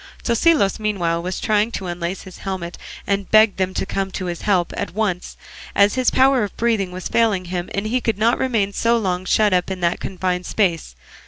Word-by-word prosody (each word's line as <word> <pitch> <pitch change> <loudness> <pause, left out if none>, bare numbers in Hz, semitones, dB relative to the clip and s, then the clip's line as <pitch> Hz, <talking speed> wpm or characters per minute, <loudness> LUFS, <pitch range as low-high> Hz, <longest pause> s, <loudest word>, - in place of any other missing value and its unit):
Tosilos 235 - +2
meanwhile 175 -6 -1
was 180 +1 -4
trying 215 +1 +1
to 190 - -4
unlace 175 +1 -4
his 185 -2 -12
helmet, 185 -3 -5 0.3
and 200 -1 +1
he 195 - -12
begged 215 -1 +5
them 185 0 0
to - - -1
come 195 0 -2
to 185 - -4
his 175 -1 -4
help 185 -4 +1
at - - -4
once, 200 -5 -2 0.4
as 200 0 +4
his 255 -1 +2
power 265 -2 +4
of 205 - -6
breathing 220 -5 0
was 185 0 -5
failing 215 -6 +1
him, 175 0 -4
and 200 +1 -2
he 245 +4 0
could 225 -4 -1
not 230 +3 +2
remain 220 -6 0
so 235 +3 +2
long 185 -4 -2
shut 210 +1 +3
up 180 0 +1
in 190 -1 -4
that 170 0 +1
confined 180 -1 -3
space. 170 - 0
195 Hz, 215 wpm, -21 LUFS, 180-220 Hz, 0.4 s, begged